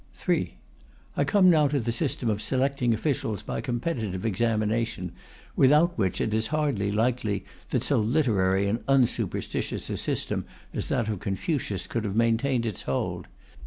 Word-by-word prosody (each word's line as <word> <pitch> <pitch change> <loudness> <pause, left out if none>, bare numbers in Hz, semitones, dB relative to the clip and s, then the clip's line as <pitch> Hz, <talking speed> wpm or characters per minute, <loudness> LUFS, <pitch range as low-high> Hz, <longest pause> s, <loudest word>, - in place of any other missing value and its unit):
3. - - -1 0.6
I - - +2
come 185 +6 +4
now 155 -3 +5
to 140 0 0
the 115 -1 -1
system 130 -1 -1
of 105 -1 0
selecting 130 0 +1
officials 110 - -1
by - - -3
competitive 120 - -2
examination, 110 -3 0 0.4
without 150 +6 +5
which 95 -5 0
it 110 - 0
is 110 0 +1
hardly 135 -8 0
likely 110 -2 0 0.2
that - - 0
so - - +2
literary 105 -6 +2
and 110 +4 -1
unsuperstitious 135 -3 0
a - - -2
system - - -1 0.3
as - - -3
that 120 -4 0
of 105 -4 -2
Confucius 100 - -2
could 115 - -3
have 100 -2 -3
maintained 115 +2 +2
its 110 -5 -3
hold. 65 -1 -2
115 Hz, 155 wpm, -27 LUFS, 105-135 Hz, 0.6 s, now